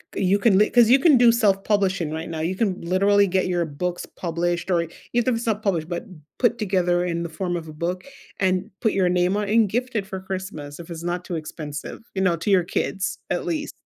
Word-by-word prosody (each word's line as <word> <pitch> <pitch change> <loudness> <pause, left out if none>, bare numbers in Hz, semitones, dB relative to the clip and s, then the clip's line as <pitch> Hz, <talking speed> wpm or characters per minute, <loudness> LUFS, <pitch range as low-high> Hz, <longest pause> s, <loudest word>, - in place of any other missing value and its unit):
you 190 +1 +2
can 200 -1 +4
li 210 - +4
'cause 240 -2 +5
you 265 - +7
can 290 -1 +6
do 240 -1 +6
self-publishing 195 -6 +1
right 160 +2 -5
now, 160 -1 -4
you 170 +4 -1
can 190 -2 0
literally 200 +4 +3
get 190 0 +1
your 175 -1 0
books 175 +4 -4
published 175 +1 -3
or 170 -2 +2 0.3
even 240 +1 +2
if - - +1
it's 230 - -5
not 215 -1 0
published, 170 -5 0
but 175 +7 -4 0.3
put 240 -1 +2
together 180 -4 +1
in 170 -1 -2
the 170 - -4
form 175 +2 -3
of 165 -2 -5
a 155 - -9
book 175 +4 -3 0.4
and 185 -1 +1
put 220 - +1
your 185 -2 +2
name 180 +1 +2
on 205 -1 -1
and 220 -1 +4
gift 250 +4 -2
it 205 -3 0
for 190 -1 -6
Christmas 185 -6 -6
if 170 0 -10
it's 165 0 -6
not 175 +1 -3
too 175 - -4
expensive, 155 -2 -6 0.2
you 190 - 0
know, 180 -3 +3
to 170 +5 -3
your 185 -2 +5
kids 190 +2 -2
at - - -1
least. 310 -3 -2
185 Hz, 235 wpm, -23 LUFS, 170-205 Hz, 0.4 s, you